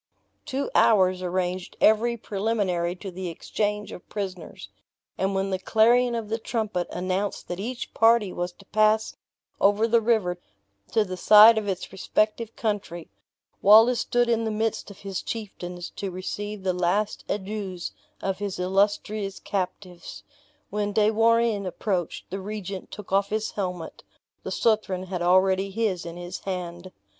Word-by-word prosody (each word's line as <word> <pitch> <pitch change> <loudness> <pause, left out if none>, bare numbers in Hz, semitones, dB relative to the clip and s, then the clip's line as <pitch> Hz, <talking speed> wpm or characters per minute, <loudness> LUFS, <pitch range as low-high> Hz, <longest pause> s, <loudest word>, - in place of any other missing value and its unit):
Two 275 0 -3
hours 185 -4 +4
arranged 180 0 -2
every 235 +2 +4
preliminary 195 -5 -1
to 190 +1 -8
the 185 +1 -5
exchange 210 +4 -3
of 180 - -11
prisoners; 185 - -6 0.5
and 195 +1 -1
when 195 0 -1
the 190 - -1
clarion 235 +5 +3
of 225 -2 -3
the 225 +2 -2
trumpet 215 -7 -2
announced 185 +2 -2
that 175 +1 -5
each 240 +5 -5
party 225 -4 +4
was 175 0 -3
to 195 +3 -19
pass 215 +2 +2 0.4
over 205 +3 +4
the 230 0 +3
river 210 -6 +1 0.5
to 220 -2 +3
the 185 -1 -5
side 215 +4 +8
of 215 -2 -2
its 190 -2 -3
respective 215 +4 -1
country, 195 -6 -3 0.5
Wallace 225 +4 +7
stood 240 +1 +1
in 230 -1 +1
the 220 - -1
midst 220 0 -2
of 200 - -13
his 195 -2 -4
chieftains 180 -5 -6
to 200 - -3
receive 200 +2 -5
the 185 -1 +1
last 180 +4 0
adieus 195 -3 -4 0.3
of 195 -1 -1
his 205 -2 -3
illustrious 195 +2 0
captives. 180 -2 -5 0.5
When 205 0 -1
De 215 +1 +4
Warenne 225 -2 +2
approached, 180 -2 -3
the 195 - -3
regent 200 -1 -6
took 210 -3 -10
off 200 +1 +2
his 215 +1 -2
helmet; 180 -4 -5 0.4
the - - -6
Southron 215 -5 +1
had 185 -1 -4
already 190 +2 +3
his 195 -4 -1
in 170 +1 -7
his 175 +1 -6
hand. 180 -1 -5
200 Hz, 150 wpm, -25 LUFS, 185-215 Hz, 0.5 s, side